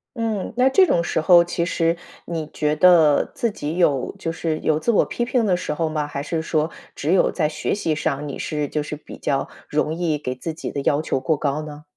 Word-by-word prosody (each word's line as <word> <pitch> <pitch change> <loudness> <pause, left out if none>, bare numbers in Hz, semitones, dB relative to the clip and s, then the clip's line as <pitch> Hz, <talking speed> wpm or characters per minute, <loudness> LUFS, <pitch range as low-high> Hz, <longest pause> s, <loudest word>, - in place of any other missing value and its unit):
嗯。 225 -4 -2
那 255 +1 +5
这 375 +8 +6
种 170 - +2
时 160 - -1
候 175 +1 +7
其 170 0 -2
实 165 -1 +1 0.3
你 165 -3 -4
觉 150 0 0
得 160 -3 +5
自 240 -6 0
己 155 -4 -4
有 145 -7 +2
就 165 - -3
是 165 -1 -2
有 155 0 +1
自 235 - +1
我 215 - +3
批 240 - -3
评 240 -1 +1
的 190 -3 +3
时 180 - -3
候 160 +1 -1
吗？ 155 -1 -2
还 140 -1 -4
是 160 +2 -2
说 155 -1 0 0.3
只 150 - -1
有 190 - +4
在 155 -4 0
学 - - -2
习 165 -6 -1
上， 145 -1 -2
你 140 - -5
是 150 -2 -2
就 150 +1 -2
是 150 - -5
比 150 - -12
较 135 -1 -1 0.2
容 155 +1 0
易 165 -3 0
给 130 -3 -4
自 160 +5 -5
己 160 - -6
的 140 - -3
要 145 +2 +2
求 145 - -1
过 145 +3 0
高 145 +1 -1
呢？ 150 -1 -9
160 Hz, 255 characters per minute, -22 LUFS, 150-175 Hz, 0.3 s, 候